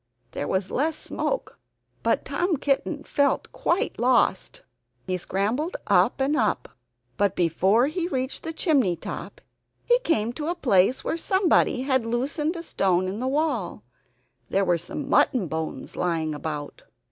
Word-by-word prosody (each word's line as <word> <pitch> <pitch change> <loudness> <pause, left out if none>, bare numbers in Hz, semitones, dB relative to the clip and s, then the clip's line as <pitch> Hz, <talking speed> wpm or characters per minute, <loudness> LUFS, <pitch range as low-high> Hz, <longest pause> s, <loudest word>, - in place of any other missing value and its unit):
There 145 - -4
was 190 0 -1
less 310 +4 0
smoke, - - -3 0.4
but - - +1
Tom 350 -2 0
Kitten 285 +2 -1
felt 285 -1 0
quite 345 - -1
lost. 255 - +2 0.4
He 185 - -1
scrambled 215 - -1
up 195 +5 +3
and 275 +3 +1
up; - - 0 0.5
but 205 -1 +2
before 190 +7 +3
he 335 +4 -2
reached 260 -5 -3
the 325 - -4
chimney 280 - +2
top 165 - -7 0.4
he 485 0 +4
came 235 - 0
to 295 +4 -4
a 345 - 0
place 245 - +3
where - - -1
somebody 370 -7 +2
had 260 -3 +1
loosened 275 +8 -1
a 335 - -5
stone 185 - +1
in 195 +3 -4
the 255 - -2
wall. 265 - -1 0.7
There 195 0 +2
were 175 -2 +2
some 225 - -5
mutton 225 -9 +3
bones 160 0 -5
lying 165 -3 -1
about. 150 -1 -5
250 Hz, 150 wpm, -25 LUFS, 185-310 Hz, 0.7 s, he